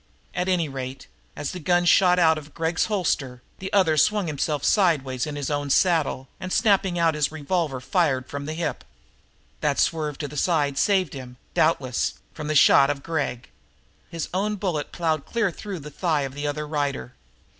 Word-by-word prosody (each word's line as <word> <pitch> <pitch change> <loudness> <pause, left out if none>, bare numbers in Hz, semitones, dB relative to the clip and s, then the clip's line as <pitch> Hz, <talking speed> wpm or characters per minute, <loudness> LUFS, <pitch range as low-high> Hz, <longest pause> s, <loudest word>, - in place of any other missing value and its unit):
At 180 +1 -1
any 175 -4 +1
rate, 135 -1 -6 0.3
as 145 -1 -4
the 180 - -6
gun 175 +1 +2
shot 180 +1 +5
out 160 -3 +4
of 145 0 -15
Gregg's 165 0 0
holster, 140 - -1 0.2
the 190 - -5
other 175 -6 +3
swung 210 +5 +3
himself 150 -1 -2
sidewise 145 - +2
in 150 - -5
his 145 0 -3
own 145 -1 -2
saddle 150 -5 +2
and, 185 - -6
snapping 195 -5 +2
out 165 -1 +3
his 150 -1 0
revolver, 155 -2 -2
fired 135 -1 +1
from 140 0 -6
the 155 - -4
hip. 160 -2 -3 0.8
That 145 -2 0
swerve 155 -3 0
to 150 - -4
the 145 - -10
side 145 -3 +1
saved 190 -7 +2
him, 125 -2 -9 0.2
doubtless, 135 -6 +1 0.2
from 155 -2 -6
the 155 - -1
shot 140 -1 +6
of 140 -1 -3
Gregg; 145 -6 -3 0.6
his 165 -2 -4
own 205 +3 0
bullet 180 -7 -3
plowed 160 -4 -1
cleanly 230 -5 0
through 200 +2 -7
the 150 +1 -9
thigh 160 -2 0
of 135 -1 -4
the 145 +1 -3
other 150 +1 -3
rider. 145 -4 -2
155 Hz, 185 wpm, -24 LUFS, 140-175 Hz, 0.8 s, shot